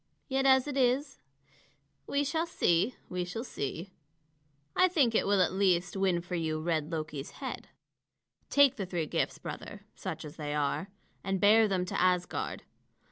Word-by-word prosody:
Yet 270 0 +1
as 265 0 +5
it 285 -1 -3
is 265 +2 +1 0.9
we 285 0 +1
shall 320 +4 -1
see, 205 - +1
we 180 0 -2
shall 180 +6 -5
see. 170 - -5 0.8
I 370 - +5
think 285 -10 +2
it - - +2
will 200 -2 +4
at 180 - -1
least 185 -2 +2
win 190 -3 +1
for 180 +1 -9
you 160 -2 -1
red 160 -1 -1
Loki's 155 -3 -4
head. - - -7 0.8
Take 280 -2 +5
the 195 -4 -3
three 175 -3 -2
gifts, - - -1
brother, - - -8
such - - -6
as 150 +2 -10
they 150 -1 -3
are, 150 +7 -1 0.3
and 195 -1 -1
bear 215 +2 +6
them 185 -3 0
to 180 - -2
Asgard. 180 -1 0
190 Hz, 165 wpm, -30 LUFS, 170-255 Hz, 0.9 s, bear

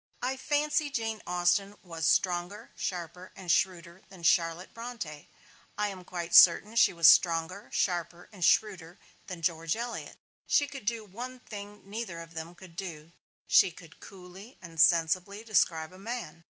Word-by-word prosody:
I 260 +2 0
fancy 295 +2 0
Jane 225 -5 -3
Austen 180 +3 +1
was 165 -3 -3
stronger, 180 +2 0
sharper 180 0 -5
and 185 -3 -3
shrewder 180 -1 0
than 185 -3 -14
Charlotte 165 +1 +1
Bronte; 230 -11 -7 0.5
I 210 0 0
am 190 -2 -9
quite 170 -1 -6
certain 200 +6 +7
she 235 - +5
was 170 -2 +4
stronger, 170 +4 +4
sharper 175 -1 -2
and 185 -4 -7
shrewder 185 -4 +1 0.3
than 180 -3 -8
George 165 +1 0
Eliot. 235 +1 -6 0.3
She 290 - +3
could 275 -6 -10
do 230 -1 -1
one 245 +6 -8
thing 205 -3 -10
neither 205 -4 -5
of 165 0 -11
them 165 +2 -7
could 180 -2 -15
do: 165 -4 -7 0.3
she 190 - +5
could 165 -1 -15
coolly 190 +4 -13
and 165 -3 -3
sensibly 180 +6 +3
describe 165 -7 +1
a 185 - -14
man. 210 -7 -6
185 Hz, 155 wpm, -29 LUFS, 170-210 Hz, 0.5 s, certain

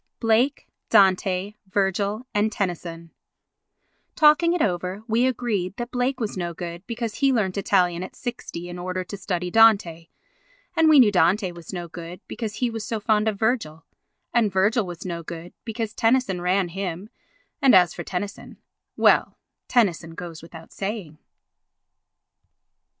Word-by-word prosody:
Blake, 235 +5 +1 0.2
Dante, 190 0 +3
Virgil 200 +4 -1
and 210 +1 +1
Tennyson 170 -4 -4 1.0
Talking 310 +2 +5
it 350 - 0
over, 185 +2 -2
we 235 +3 +2
agreed 220 -7 -2
that 240 0 -5
Blake 255 +2 -1
was 220 -3 -3
no 175 -2 -4
good 170 0 -6
because 230 -2 -4
he 275 -1 +3
learnt 210 -7 0
Italian 180 -3 +1
at 185 - -7
60 230 -8 -6
in 175 0 -7
order 185 +1 -3
to 200 - -8
study 180 -2 -3
Dante, 200 -7 +4 0.7
and 325 -1 +5
we 305 -2 +7
knew 225 -5 +6
Dante 185 +1 +2
was 170 -2 -10
no 175 -2 -5
good 170 +1 -9
because 220 -3 -5
he 245 +2 0
was 225 -1 -5
so 225 0 -3
fond 215 0 +1
of 215 -2 0
Virgil, 195 -9 -1 0.5
and 230 -4 +3
Virgil 200 +3 +2
was 175 0 -8
no 170 -2 -4
good 170 +1 -8
because 225 -1 -4
Tennyson 225 -6 +1
ran 180 +1 +1
him, 190 +2 -5 0.5
and 270 -5 +6
as 180 -2 +5
for - - -6
Tennyson—well, 200 +3 -1 0.3
Tennyson 175 -9 +1
goes 170 -2 -8
without 165 0 -12
saying. 195 -7 -5
195 Hz, 150 wpm, -24 LUFS, 175-225 Hz, 1.0 s, we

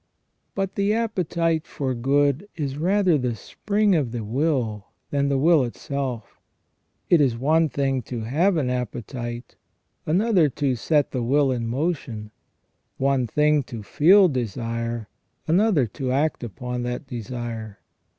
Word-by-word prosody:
"* - - -49
But 195 -1 -2
the 200 +1 +1
appetite 170 -7 0
for 135 -2 -3
good 140 - +1
is 140 -4 -3
rather 180 0 +2
the 125 -2 -1
spring 205 - 0
of 145 -9 +1
the 120 -2 -4
will 115 -4 -1 0.2
than 140 0 +1
the 140 - +1
will 155 +1 +4
itself 125 -3 -5 0.7
It 170 -3 +6
is 125 -5 +2
one 155 +5 +2
thing 135 -2 0
to 120 -3 -3
have 165 - +1
an 130 -5 0
appetite, 120 -1 -5 0.5
another 180 -1 +3
to 135 0 -1
set 145 +4 +1
the 130 - -2
will 135 +3 +2
in 120 -2 -2
motion; 120 -6 -3 0.7
one 135 -2 +1
thing 150 +4 +3
to 115 -4 -7
feel 185 - +5
desire, 115 - -3 0.4
another 175 - +3
to 130 +4 -4
act 145 +1 0
upon 125 +3 -5
that 125 +2 -4
desire. 115 -3 -6
135 Hz, 140 wpm, -24 LUFS, 120-160 Hz, 0.7 s, It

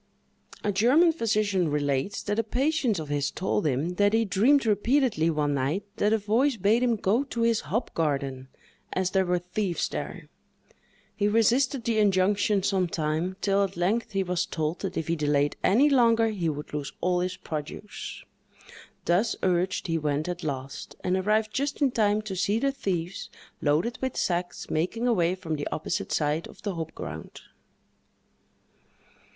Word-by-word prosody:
A 205 - +1
German 255 - +5
physician 210 - +1
relates, 145 +5 -1
that 205 +2 -1
a - - +2
patient 260 - 0
of 155 -3 -5
his 145 -1 0
told 190 -1 -1
him, 140 +4 0
that 205 0 +3
he 225 0 +3
dreamed 235 +8 +3
repeatedly, 220 - +2
one 150 -2 0
night, 140 +8 -1
that 210 - +2
a 220 - +4
voice 230 +6 +1
bade 215 +5 +3
him 245 -2 +2
go 220 +5 +1
to 235 -4 -4
his 230 -1 +3
hop 230 +4 -1
garden, 140 -4 -1 0.5
as 185 -1 0
there 190 -1 +2
were 180 0 +2
thieves 180 +1 -2
there. - - -6 0.9
He 205 - +1
resisted 235 +4 +2
the 225 -1 +1
injunction 200 0 +2
some 190 -2 +1
time, 165 +3 -2
till 200 0 +2
at 195 -2 -4
length 205 +6 0
he 195 -1 +1
was 180 0 -1
told 160 0 -2
that 190 -2 -4
if 160 - -2
he 170 - +1
delayed 145 -2 +1
any 245 +10 +5
longer 230 -5 +4
he 185 -6 -1
would 150 0 -6
lose 145 -2 -3
all 180 0 +1
his 180 +1 -2
produce. 155 +7 -6 0.8
Thus 190 +7 +2
urged, 185 0 +1
he 165 -2 0
went 150 +1 -1
at 180 0 -4
last, 135 -2 -5
and 180 - +1
arrived 215 +3 +1
just 280 +1 -1
in 280 -3 +3
time 215 -2 +2
to 205 -3 -5
see 200 +3 +1
the 275 +4 +1
thieves, 180 -8 -3 0.3
loaded 155 +12 +1
with 260 -1 -2
sacks, 175 0 -2
making 200 +10 -1
away 180 -6 +2
from 160 -4 -4
the 145 - -3
opposite 155 - -3
side 150 +2 0
of - - -16
the 205 -2 -2
hop 160 -2 -5
ground. 80 0 -8
190 Hz, 170 wpm, -27 LUFS, 165-225 Hz, 0.9 s, German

